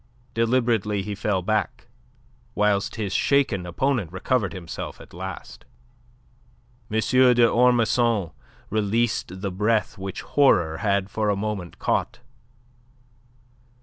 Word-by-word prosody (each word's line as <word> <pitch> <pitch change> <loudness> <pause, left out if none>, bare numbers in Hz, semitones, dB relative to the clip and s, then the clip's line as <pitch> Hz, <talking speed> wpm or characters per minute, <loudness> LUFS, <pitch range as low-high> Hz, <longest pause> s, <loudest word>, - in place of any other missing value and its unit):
Deliberately 115 -4 +1
he 105 - -4
fell 100 -2 -1
back, 110 +1 -1 0.7
whilst 105 -1 +1
his 105 -4 -3
shaken 130 -11 +1
opponent 115 - -1
recovered 100 +2 0
himself 85 -3 -7
at - - -14
last. 85 -9 -8 1.3
M. 110 - -1
d'Ormesson 120 -4 +3 0.4
released 110 -3 -1
the 100 -1 -2
breath 105 +2 0
which 95 0 -5
horror 90 - +3
had 100 -1 0
for 110 -1 0
a 100 - +2
moment 100 -4 -4
caught. - - -1
105 Hz, 105 wpm, -24 LUFS, 95-115 Hz, 1.3 s, d'Ormesson